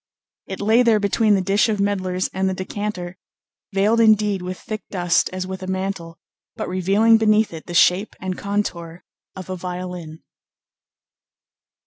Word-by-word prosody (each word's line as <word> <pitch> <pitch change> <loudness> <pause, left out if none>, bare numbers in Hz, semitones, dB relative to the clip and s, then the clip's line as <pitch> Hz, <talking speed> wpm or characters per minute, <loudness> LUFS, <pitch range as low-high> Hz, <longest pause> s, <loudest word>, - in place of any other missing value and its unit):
It 190 - -6
lay 220 +4 +4
there 230 -3 +4
between 210 +1 +2
the 190 - 0
dish 200 +4 +2
of 215 - 0
medlars 185 -2 0
and 190 0 0
the 190 - -2
decanter, 185 -2 -5 0.5
veiled 205 +4 +2
indeed 210 -3 +3
with 180 0 -5
thick 215 -1 -6
dust 175 -3 +1
as 185 0 -4
with 190 0 -6
a 185 - -6
mantle, 185 -3 -4 0.4
but - - -4
revealing 200 +5 +3
beneath 215 -2 +3
it 160 - -9
the 175 - -6
shape 180 +5 +3
and 185 0 -4
contour 180 -5 -4 0.3
of 185 -2 -8
a 185 - -4
violin. 180 -3 -7
190 Hz, 155 wpm, -21 LUFS, 180-210 Hz, 0.5 s, lay